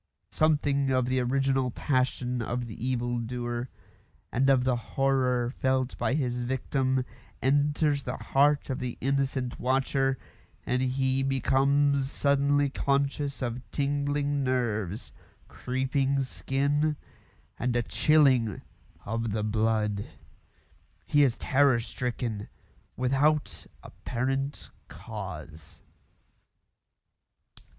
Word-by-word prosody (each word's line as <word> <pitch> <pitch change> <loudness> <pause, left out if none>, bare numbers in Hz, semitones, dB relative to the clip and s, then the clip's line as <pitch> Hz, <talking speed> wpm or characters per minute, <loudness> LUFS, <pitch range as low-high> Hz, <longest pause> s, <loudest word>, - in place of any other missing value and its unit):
Something 145 -3 +2
of 130 -1 +2
the 130 +1 +1
original 135 +1 +1
passion 125 -1 -1
of 120 +2 -2
the 115 0 -8
evil 120 -1 -1
doer, 120 +1 -4 0.6
and 135 +3 +2
of 130 -2 +4
the 130 -1 +2
horror 125 -1 0
felt 130 -1 0
by 130 - +1
his 125 -4 -1
victim, 130 +1 0 0.3
enters 145 +2 +2
the 125 0 -4
heart 145 0 +2
of 130 - -2
the 125 -1 -4
innocent 135 -1 -1
watcher, 135 +1 +1 0.5
and 125 +1 0
he 130 +1 +1
becomes 135 +1 +2
suddenly 140 0 +2
conscious 140 0 -1
of 120 0 -3
tingling 145 0 0
nerves, 110 - -1 0.3
creeping 135 +2 0
skin, 145 +3 0 0.6
and 120 0 0
a 120 - +2
chilling 125 -3 +3 0.5
of 115 0 -2
the 105 -1 -1
blood. 105 -1 0 1.0
He 145 - +3
is 130 -5 +3
terror 135 -3 +3
stricken 115 -3 -4 0.5
without 140 +4 +1 0.2
apparent 135 +3 -3 0.2
cause. 80 -1 -9
130 Hz, 100 wpm, -28 LUFS, 120-140 Hz, 1.0 s, of